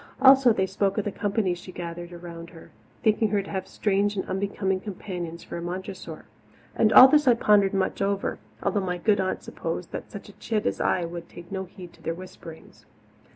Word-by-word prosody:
Also 265 -1 +7
they 190 -3 +1
spoke 195 +1 -1
of 210 - 0
the 205 - -1
company 200 -2 0
she 175 +1 -9
gathered 175 0 -7
around 170 -1 -9
her, 165 -2 -14 0.3
thinking 220 -1 +3
her 205 -1 0
to - - -10
have 190 -1 -3
strange 205 0 0
and 190 - -3
unbecoming 190 0 -1
companions 180 -4 -6
for - - -7
a - - -5
Montressor. 185 +2 -6 0.7
All 255 - +12
this 295 +1 +3
I 245 - +8
heard - - -1
and - - -14
pondered 205 -2 +4
much 195 0 -1
over, 200 0 -1 0.2
although 205 - +1
my 180 -1 -2
good 205 +3 +2
aunts 185 -1 -2
supposed - - -5
that - - -6
such - - -9
a - - -11
chit 220 -1 -1
as - - -1
I 180 - +1
would 170 0 -7
take 175 +2 -12
no 190 -1 -3
heed 180 -1 -12
to - - -20
their 165 - -3
whisperings. 170 -2 -12
190 Hz, 210 wpm, -26 LUFS, 175-205 Hz, 0.7 s, All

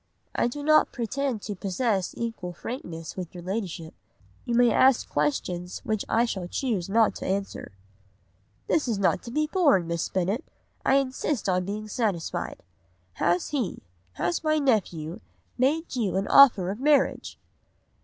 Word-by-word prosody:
"'I - - +1
do 285 +4 -5
not 310 +1 +4
pretend 250 -1 -2
to 210 - -4
possess 195 0 -1
equal 225 -6 -4
frankness 170 - -7
with 180 -2 -7
your 175 - -8
Ladyship. 180 -4 -4 0.5
You 240 -2 -1
may 240 -1 +5
ask 260 +2 +4
questions 175 +5 -1
which 215 -2 -1
I 235 +1 +3
shall 200 -5 -3
not - - -9
choose 220 -10 -1
to 220 +2 +2
answer.' 195 - -3 0.9
"'This 310 -4 +1
is 225 -4 0
not 195 -2 +2
to - - -9
be 305 +6 +1
borne, 300 - +3
Miss 170 0 -2
Bennet, 190 +6 -1 0.4
I 270 - +3
insist 270 -2 0
on 180 -1 +1
being 210 +2 -4
satisfied. 205 -7 -2 0.6
Has 175 +1 +2
he, 265 -9 -2 0.3
has 175 - -1
my 310 0 +2
nephew, 190 - 0 0.4
made 295 +5 +1
you 210 -6 0
an 195 - -1
offer 210 -10 +7
of 205 - -6
marriage? 285 0 +2
215 Hz, 155 wpm, -26 LUFS, 180-260 Hz, 0.9 s, offer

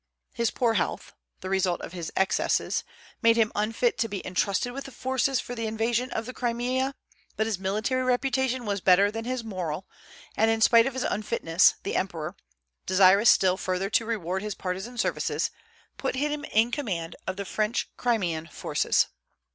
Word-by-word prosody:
His 235 -1 +1
poor 235 -3 +1
health - - -2 0.3
(the 185 - -5
result 185 -2 +1
of - - -8
his 170 -3 -5
excesses) 190 - +1 0.4
made 230 -1 +5
him 220 -2 +3
unfit 225 +3 0
to 225 - +2
be 200 -3 -5
intrusted 200 +5 0
with 275 +1 -6
the 270 - -9
forces 260 0 0
for 245 - -6
the 230 -2 -3
invasion 230 +3 0
of 225 - -3
the 255 - -7
Crimea; 250 +3 -1 0.4
but 220 - +1
his 220 -4 -2
military 215 +7 0
reputation 255 0 0
was 200 -2 -2
better 195 +3 +5
than 225 +1 -5
his 255 -1 -2
moral, 185 -5 -4 0.5
and 220 +1 +3
in 225 0 +2
spite 230 +1 +6
of 270 - -4
his 260 - -1
unfitness 195 -5 +2
the - - -3
emperor 165 -5 -2 0.5
desirous 195 +3 +6
still 185 -1 +4
further 185 +2 -2
to 230 - +3
reward 190 -5 -2
his 210 -1 -4
partisan 190 +7 -5
services - - 0 0.5
put - - -2
him 295 +2 -1
in 225 -1 +2
command 185 - -3
of 190 0 -3
the 200 - -4
French 215 +4 -1
Crimean 180 -10 0
forces. 155 - +1
220 Hz, 175 wpm, -27 LUFS, 190-245 Hz, 0.5 s, spite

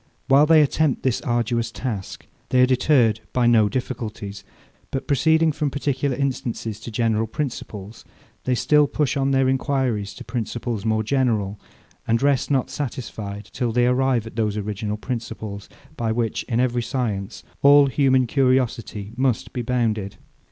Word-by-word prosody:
While 140 +2 +5
they 160 -1 +7
attempt 150 -1 0
this 130 -3 0
arduous 120 -1 0
task, 115 -6 -5 0.2
they 130 - +3
are - - +7
deterred 125 -4 +3
by 125 -1 +2
no 110 -3 +5
difficulties; 105 -5 -5 0.5
but 135 - -3
proceeding 160 +3 +3
from 145 0 -1
particular 140 -1 -1
instances 125 -5 -3
to - - -8
general 115 -1 0
principles, 110 -5 -6 0.4
they 130 - +2
still 150 +3 +4
push 150 -1 0
on 135 -1 +1
their 135 -1 +3
enquiries 130 -6 0
to - - -9
principles 115 -1 -4
more 110 0 +1
general, 110 -5 0 0.5
and 115 0 +2
rest 140 0 +1
not 135 -3 +1
satisfied 110 -7 -5
till 120 -2 -1
they 120 +1 +2
arrive 125 -2 +2
at 110 - -10
those 105 -2 0
original 105 0 -3
principles, 110 -4 -6 0.3
by 115 -1 -1
which, 115 -1 -1
in 115 -2 -1
every 125 -1 +1
science, 115 -5 -3 0.2
all 145 0 +7
human 130 -1 +3
curiosity 120 -5 0
must 130 -2 0
be 125 - -2
bounded. 110 -5 -1
120 Hz, 150 wpm, -23 LUFS, 110-135 Hz, 0.5 s, they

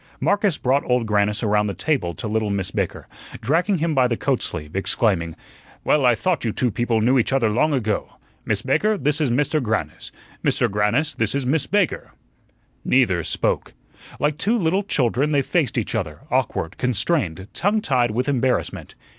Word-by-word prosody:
Marcus 200 -5 +1
brought 135 +3 +1
Old 125 -2 +2
Grannis 105 +1 +1
around 105 -1 +2
the 100 - -3
table 90 - -1
to 115 - -5
little 110 0 -1
Miss 100 -3 -2
Baker, - - -3 0.3
dragging 165 - +1
him 165 0 0
by 130 -3 +3
the 120 -2 -1
coat - - 0
sleeve, 75 +2 -5
exclaiming: 95 -4 0 0.5
"Well, 140 -4 +3
I 120 - +5
thought 180 +3 -1
you 115 - 0
two 125 +2 0
people 115 +1 0
knew 125 +4 +3
each 120 - 0
other 125 -5 +2
long 155 +8 +2
ago. 110 -7 -1 0.3
Miss - - -1
Baker, 215 0 +1
this 150 +1 0
is 145 - +2
Mr. 145 +5 +1
Grannis; 110 -3 -3 0.3
Mr. - - +2
Grannis, 105 +9 +1
this 110 +2 0
is 140 -2 -1
Miss 140 +3 0
Baker." 205 -3 0 0.7
Neither 95 -10 +2
spoke. - - -1 0.4
Like 150 +1 0
two 225 +5 +1
little 185 0 +1
children 145 - 0
they 140 -1 +3
faced 155 -3 0
each 115 - -1
other, 85 -10 -3
awkward, 80 - -1
constrained, 115 - 0
tongue 205 +5 +1
tied 125 - +1
with 125 +5 -1
embarrassment. 130 -2 -1
125 Hz, 180 wpm, -22 LUFS, 105-150 Hz, 0.7 s, I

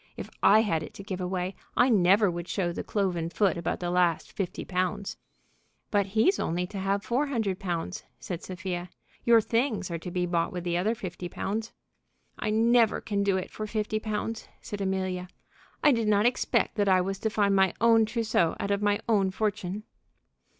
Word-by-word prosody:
If - - -7
I 215 +2 +7
had 165 -8 0
it - - -9
to 195 - -8
give 190 -2 -5
away, 180 +1 -2 0.2
I 245 - +6
never 200 -1 +4
would 175 0 -5
show 180 -4 -1
the - - -4
cloven 180 -5 -1
foot 190 +3 +2
about 170 - -2
the 175 -1 -2
last 175 -2 +1
fifty 195 -3 -4
pounds!" 185 +1 -2 0.8
"But 200 -2 +2
he's 370 - +4
only 175 +2 -1
to 200 - -3
have 195 +1 0
four 260 +7 0
hundred 220 -9 -1
pounds," 175 -1 -3 0.2
said 175 -2 -5
Sophia. 180 -1 -5 0.4
"Your 235 -1 +7
things 225 -5 0
are 170 - -3
to 180 - -6
be 180 0 -1
bought 170 -1 0
with 180 -2 -5
the 175 -1 -1
other 205 +6 +1
fifty 180 -3 -6
pounds." 215 +5 -3 0.7
"I - - -1
never 230 +1 +4
can 205 -2 -2
do 200 -1 +2
it 185 - -5
for 215 - -5
fifty 215 0 -1
pounds," 215 +1 -3
said 205 -1 -6
Amelia. 185 -1 -2 0.6
"I 295 - +7
did 230 -4 +1
not 210 0 +3
expect 245 -1 +1
that 205 -1 +2
I 185 -1 +5
was 195 +1 -2
to 220 - 0
find 205 -2 +2
my 190 -2 +4
own 225 -1 +5
trousseau 220 -7 +1
out 200 - -2
of 200 0 +1
my 205 0 +2
own 200 -4 +3
fortune." 200 0 -2
195 Hz, 195 wpm, -28 LUFS, 180-215 Hz, 0.8 s, I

